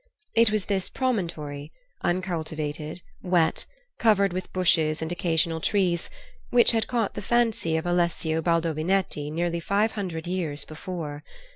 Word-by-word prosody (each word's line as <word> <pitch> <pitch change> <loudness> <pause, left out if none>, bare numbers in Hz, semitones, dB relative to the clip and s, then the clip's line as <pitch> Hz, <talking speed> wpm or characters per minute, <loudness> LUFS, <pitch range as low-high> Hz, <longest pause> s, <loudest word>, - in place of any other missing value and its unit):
It 230 -1 +5
was 215 -2 +2
this 195 -2 0
promontory, 165 - -2 0.3
uncultivated, 160 -3 -2 0.2
wet, 175 -3 +1 0.3
covered 200 -4 +4
with 185 0 -4
bushes 170 -4 +2
and 160 +1 -3
occasional 165 -2 0
trees, 180 -4 +1 0.4
which 240 -1 +5
had 225 -2 +1
caught 235 -5 0
the - - -5
fancy 225 -7 +1
of 160 - -3
Alessio 170 -2 +1
Baldovinetti 165 -1 0
nearly 170 +1 -1
five 205 +6 +1
hundred 175 -6 -4
years 170 -5 -2
before. 155 -2 -6
175 Hz, 130 wpm, -26 LUFS, 160-195 Hz, 0.4 s, It